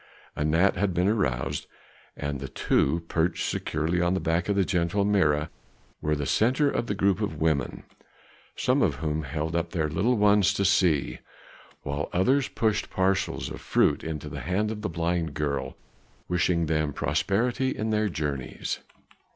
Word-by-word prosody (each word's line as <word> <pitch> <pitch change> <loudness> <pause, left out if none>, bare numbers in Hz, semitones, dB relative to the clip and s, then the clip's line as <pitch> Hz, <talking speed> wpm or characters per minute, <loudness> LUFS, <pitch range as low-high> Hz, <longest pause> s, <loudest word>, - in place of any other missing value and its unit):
Anat 80 +6 +2
had 95 -1 0
been 90 +2 +2
aroused, 65 - 0 0.5
and 70 -1 -3
the 70 - -5
two, 80 +5 +1
perched 85 +1 0
securely 80 +4 -1
on 90 +1 +2
the - - 0
back 85 +3 0
of 100 - +2
the 100 -1 +2
gentle 90 +2 +1
Mirah, 80 -7 +2 0.5
were 75 0 +1
the 75 -1 -3
centre 130 - +2
of 120 - -2
a 100 - 0
group 100 +1 +2
of 100 -8 -3
women, 80 -3 0 0.7
some - - +1
of - - +2
whom 75 0 -2
held 75 +3 -3
up 85 0 0
their 80 -3 +1
little 105 +11 +1
ones 100 -1 +4
to 100 - +1
see, 90 -6 +2 0.6
while 70 +1 -3
others 130 +10 +3
pushed 110 -2 0
parcels 95 0 0
of - - -7
fruit - - +2
into 80 -2 -5
the - - -6
hand 100 +5 0
of 105 -1 -5
the 105 - -2
blind 85 -1 -1
girl, 70 -2 -2 0.5
wishing 90 -1 +1
them 75 -2 0
prosperity 100 - 0
in 110 -3 -2
their 105 -1 +1
journeyings. 75 -6 -3
85 Hz, 165 wpm, -27 LUFS, 75-100 Hz, 0.7 s, ones